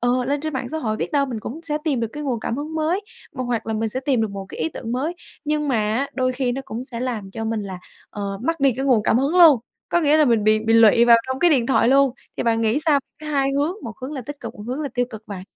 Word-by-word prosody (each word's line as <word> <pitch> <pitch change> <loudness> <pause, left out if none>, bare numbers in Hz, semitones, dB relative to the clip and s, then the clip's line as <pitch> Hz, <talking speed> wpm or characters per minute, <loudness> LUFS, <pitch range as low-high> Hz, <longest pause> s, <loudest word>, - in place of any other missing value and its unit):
ờ, 245 +1 +1
lên 280 +2 -1
trên 310 0 -3
mạng 260 -2 -3
xã 315 - -3
hội 215 -6 -2
biết - - -4
đâu 280 -1 +2
mình 235 -4 -5
cũng 280 +9 -7
sẽ 300 -2 -2
tìm 280 -6 0
được 230 - -1
cái 300 - -6
nguồn 250 -6 -2
cảm 230 - -3
hứng 305 +2 -5
mới, 320 +5 0 0.3
m 280 - -14
hoặc 245 -3 -2
là 220 - -2
mình 220 +1 -1
sẽ 255 - -3
tìm 265 -3 +1
được 220 -2 0
một 195 -1 -7
cái - - -8
ý 160 - +1
tưởng 230 +7 -6
mới. 295 +8 -1 0.3
Nhưng 300 -1 0
mà 250 - +2 0.2
á 275 +4 0
đôi 255 -1 +1
khi 250 -1 -1
nó 270 - -3
cũng 235 +2 -6
sẽ 240 -3 -7
làm 230 -6 -3
cho 225 +2 -5
mình 220 -1 -2
là, 190 -2 -6 0.3
ờ, 200 -1 -4
mất 330 +1 -1
đi 275 -2 +4
cái 270 - -2
nguồn 245 -6 +3
cảm 220 - +3
hứng 275 +4 +1
luôn, 315 -8 +8 0.3
có 345 - +2
nghĩa 300 -1 +4
là 305 - +5
mình 230 -5 +2
bị 215 0 +4
bị 225 +1 0
lụy 230 +1 +6
vào 235 -1 +8
trong 260 0 -3
cái 350 - +4
điện 255 -6 +3
thoại 260 - +3
luôn, 275 -1 +4 0.2
thì - - -1
bạn 230 -1 +1
nghĩ 225 +4 +2
sao 290 -3 +4 0.2
cái 310 - -8
hai 275 -2 +1
hướng, 290 +5 +1
một 230 -4 -6
hướng 275 +4 -5
là 265 -4 -5
tích 290 -1 -7
cực, 230 -1 -7
một 205 - -10
hướng 260 +5 -3
là 285 - -2
tiêu 245 0 +2
cực 220 0 -10
bạn? 195 -3 -6
255 Hz, 310 wpm, -22 LUFS, 225-285 Hz, 0.3 s, luôn